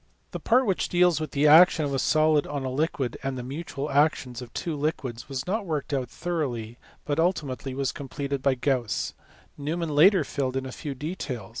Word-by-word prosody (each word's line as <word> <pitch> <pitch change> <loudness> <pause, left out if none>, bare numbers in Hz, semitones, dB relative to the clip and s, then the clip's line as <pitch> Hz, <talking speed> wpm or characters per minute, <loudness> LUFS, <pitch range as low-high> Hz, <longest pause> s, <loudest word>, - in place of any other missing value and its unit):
The - - -5
part 255 +3 +3
which 195 -4 0
deals 175 -2 +3
with 155 - -3
the 145 0 +1
action 160 +1 +7
of 140 - -2
a 135 - 0
solid 155 0 +3
on 145 -2 -4
a 130 - -2
liquid 135 -3 -1
and 135 -1 -3
the 125 - -5
mutual 145 +1 -5
action 140 -3 +2
of 120 -2 -9
two 165 -3 -3
liquids 140 -5 -3
was 130 -1 -4
not 210 +4 -1
worked 150 -3 -3
out 130 -3 -1
thoroughly, 125 -10 -3 0.3
but 145 +1 -1
ultimately 140 -7 -1
was 135 -1 -1
completed 140 0 -4
by 135 -1 +2
Gauss: 125 -3 -1 0.5
Neumann 160 +2 -2
later 180 +4 +6
filled 135 -2 -2
in 135 - -3
a 130 - -6
few 145 0 -6
details. 140 - -5
145 Hz, 195 wpm, -26 LUFS, 130-160 Hz, 0.5 s, action